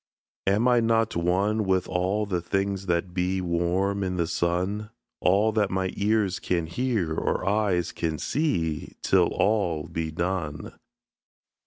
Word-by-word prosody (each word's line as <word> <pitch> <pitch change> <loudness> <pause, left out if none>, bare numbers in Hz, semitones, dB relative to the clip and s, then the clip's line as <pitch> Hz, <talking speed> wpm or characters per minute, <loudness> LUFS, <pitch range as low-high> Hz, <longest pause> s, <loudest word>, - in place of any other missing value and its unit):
Am 105 +5 +3
I 125 -1 +5
not 115 -1 +1
one 95 +6 +1
with 95 -2 +1
all 95 +4 0
the 90 -4 -2
things 95 +2 -2
that 90 +1 0
be 95 +1 0
Warm 90 +3 0
in 90 -1 -2
the 85 - +1
sun? 90 +6 -1 0.3
All 100 +4 +3
that 105 -2 +1
my 95 0 -1
ears 100 -2 +1
can 85 -3 -1
hear, 100 -2 -1
or 85 - -1
eyes 100 -4 +1
can 80 -2 -2
see, 85 - -1
Till - - +4
all 95 -8 +1
be 80 -1 -3
done. 85 -2 -3
95 Hz, 145 wpm, -26 LUFS, 85-105 Hz, 0.3 s, I